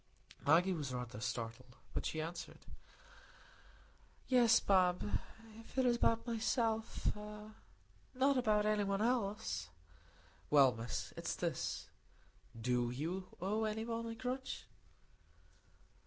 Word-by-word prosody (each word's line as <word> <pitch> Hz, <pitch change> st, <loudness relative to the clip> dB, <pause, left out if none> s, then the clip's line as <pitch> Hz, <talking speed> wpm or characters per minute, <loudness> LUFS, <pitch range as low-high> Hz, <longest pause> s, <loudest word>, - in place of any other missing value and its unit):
Maggie 175 Hz, +5 st, +5 dB
was 150 Hz, -6 st, -3 dB
rather 120 Hz, -3 st, -5 dB
startled, 115 Hz, +3 st, -4 dB, 0.2 s
but -, -, -1 dB
she 160 Hz, -, -3 dB
answered, 170 Hz, +2 st, -6 dB, 1.6 s
"Yes, 240 Hz, -3 st, +6 dB
Bob, 180 Hz, -, +3 dB, 0.5 s
if 225 Hz, -, -14 dB
it 260 Hz, -, +4 dB
is 240 Hz, -1 st, +4 dB
about 230 Hz, -1 st, +2 dB
myself—not 225 Hz, -1 st, 0 dB, 1.5 s
about 215 Hz, -4 st, +3 dB
any 210 Hz, -1 st, +2 dB
one 200 Hz, +1 st, 0 dB
else." 220 Hz, -, 0 dB, 0.8 s
"Well, 140 Hz, -3 st, +7 dB
Miss, 115 Hz, +1 st, -4 dB
it's -, -, -3 dB
this. -, -, -2 dB, 0.7 s
Do 120 Hz, +1 st, +1 dB
you 165 Hz, +9 st, -3 dB
owe 210 Hz, +5 st, 0 dB
anybody 230 Hz, +1 st, -2 dB
a -, -, -9 dB
grudge?" 255 Hz, +3 st, -4 dB
200 Hz, 105 wpm, -37 LUFS, 140-225 Hz, 1.6 s, Well